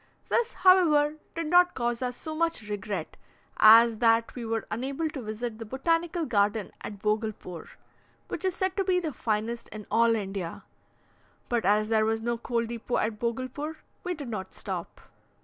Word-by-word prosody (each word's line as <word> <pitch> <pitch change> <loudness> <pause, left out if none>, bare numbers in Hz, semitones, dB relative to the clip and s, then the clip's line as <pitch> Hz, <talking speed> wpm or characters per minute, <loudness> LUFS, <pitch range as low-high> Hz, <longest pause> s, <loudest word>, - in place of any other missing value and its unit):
This, 475 0 +1
however, 310 -5 +5 0.2
did 330 0 -2
not 355 +3 +4
cause 240 -1 -1
us 250 -1 -2
so 315 - -6
much 330 -9 -1
regret, 205 -1 -4 0.4
as 225 +1 +8
that 230 0 +3
we 245 - -6
were 225 0 -2
unable 270 +8 -2
to 275 - -6
visit 220 +1 -5
the - - -4
Botanical 330 - 0
Garden 205 -4 +1
at 205 - -7
Bogulpore, 210 -4 -3 0.6
which 330 - -5
is 375 -2 0
said 375 0 -1
to 390 - +2
be 370 -1 +2
the 320 -5 -3
finest 225 +1 -2
in 215 -1 -8
all 230 0 +4
India; 195 -5 -4 0.9
but 235 -4 0
as 210 +2 +3
there 220 -1 +3
was 225 0 0
no 235 0 0
coal 235 0 -1
depot 235 +1 -3
at 215 -1 -1
Bogulpore, 255 +7 -3 0.3
we 360 -2 -2
did 285 -5 -7
not 200 -4 -5
stop. - - -5
235 Hz, 170 wpm, -28 LUFS, 215-310 Hz, 0.9 s, as